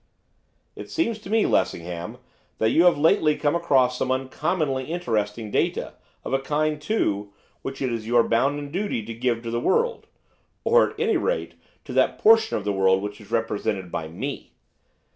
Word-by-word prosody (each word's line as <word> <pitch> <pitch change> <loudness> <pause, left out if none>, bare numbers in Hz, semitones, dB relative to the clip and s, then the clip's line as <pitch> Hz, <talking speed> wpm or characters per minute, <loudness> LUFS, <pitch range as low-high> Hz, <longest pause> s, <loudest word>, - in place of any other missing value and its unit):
'It - - -9
seems 230 -10 -1
to 205 - -11
me, 220 0 +3
Lessingham, 90 +6 -1 0.4
that 110 - +2
you 170 - +4
have 175 - +5
lately 155 0 +3
come 145 +1 0
across 130 -7 +2
some 130 - -1
uncommonly 135 +1 -1
interesting 110 -9 -2
data, - - -1 0.3
of - - -4
a 135 - +3
kind, 150 +2 -1
too, 105 - -1 0.3
which 135 0 -5
it 125 -2 0
is 110 -1 -4
your 120 0 +4
bounden 140 +5 0
duty 185 - -2
to 115 - -6
give 120 0 -1
to 115 - -4
the 120 - 0
world, 475 - 0 0.6
or, - - +4
at 440 - -14
any 450 -4 +2
rate, 485 +8 -2 0.3
to - - -8
that - - +2
portion 225 0 +5
of 105 - -5
the 100 - 0
world 95 0 +3
which 105 +1 -6
is 100 - -15
represented 105 -5 -2
by 80 - -3
me. 120 - -6
130 Hz, 180 wpm, -24 LUFS, 110-170 Hz, 0.6 s, have